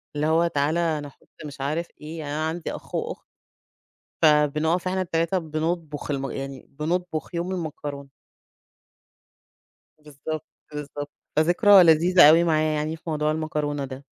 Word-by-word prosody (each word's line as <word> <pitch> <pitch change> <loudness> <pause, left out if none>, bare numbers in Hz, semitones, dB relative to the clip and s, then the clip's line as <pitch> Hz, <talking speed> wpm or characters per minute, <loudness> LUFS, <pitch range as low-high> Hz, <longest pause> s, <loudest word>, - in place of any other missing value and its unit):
اللي 150 +1 0
هو 165 +2 +3
تعالَ 150 0 0
أنا 155 -4 -1
هاحط - - -19 0.2
مش 140 -2 -8
عارف 155 +5 -2
إيه. 160 +2 -7
يعني 145 -2 -5
أنا 155 +1 -1
عندي 165 0 -4
أخ، - - -9
وأخت، - - -4 1.0
فبنقف 155 +3 +3
إحنا 190 +1 -1
ال3 170 +1 0
بنطبخ 155 -2 -3
الم 135 -2 -2
يعني 135 -1 -6
بنطبخ 165 +3 -3
يوم 170 +2 -2
المكرونة. 145 -5 -5 1.9
بالضبط، 150 +1 -7 0.3
بالضبط، 145 0 -6 0.2
فذكرى 180 +5 +6
لذيذة 170 0 +7
أوي 165 +2 +6
معايا، 155 -2 +2
يعني 155 +2 -2
في - - -31
موضوع 150 0 0
المكرونة 150 -2 -2
ده. 130 +1 -9
155 Hz, 140 wpm, -24 LUFS, 145-170 Hz, 1.9 s, لذيذة